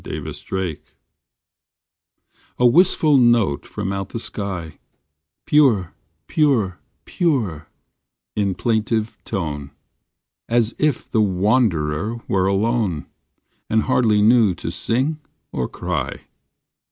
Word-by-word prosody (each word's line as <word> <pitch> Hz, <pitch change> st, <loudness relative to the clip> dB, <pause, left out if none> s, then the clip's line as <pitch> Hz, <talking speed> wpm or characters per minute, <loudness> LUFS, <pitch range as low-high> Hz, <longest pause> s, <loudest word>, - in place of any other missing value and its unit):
THE -, -, -5 dB
BLUEBIRD 95 Hz, -5 st, -4 dB, 1.8 s
A 125 Hz, -, +2 dB
WISTFUL 155 Hz, +1 st, +5 dB
note 115 Hz, -, +3 dB
from 95 Hz, -, -4 dB
out 95 Hz, 0 st, -4 dB
the -, -, -5 dB
sky, 95 Hz, -8 st, -5 dB, 0.7 s
"Pure, 120 Hz, -, +3 dB, 0.3 s
pure, 120 Hz, -, +1 dB, 0.3 s
pure," 110 Hz, -, -1 dB, 0.7 s
in 100 Hz, -3 st, 0 dB
plaintive 110 Hz, -1 st, -1 dB
tone, 75 Hz, -8 st, -4 dB, 0.8 s
As 115 Hz, -1 st, +2 dB
if 150 Hz, -2 st, 0 dB
the 110 Hz, -, +1 dB
wand 105 Hz, +2 st, +2 dB
rer 75 Hz, +9 st, -2 dB
were 95 Hz, -1 st, +1 dB
alone, 100 Hz, -4 st, 0 dB, 0.6 s
And 110 Hz, 0 st, +2 dB
hardly 110 Hz, -5 st, +3 dB
knew 110 Hz, -4 st, +5 dB
to 85 Hz, -, -5 dB
sing 130 Hz, -, -1 dB, 0.3 s
or 65 Hz, -2 st, -2 dB
cry. -, -, -4 dB
105 Hz, 105 wpm, -21 LUFS, 95-120 Hz, 1.8 s, WISTFUL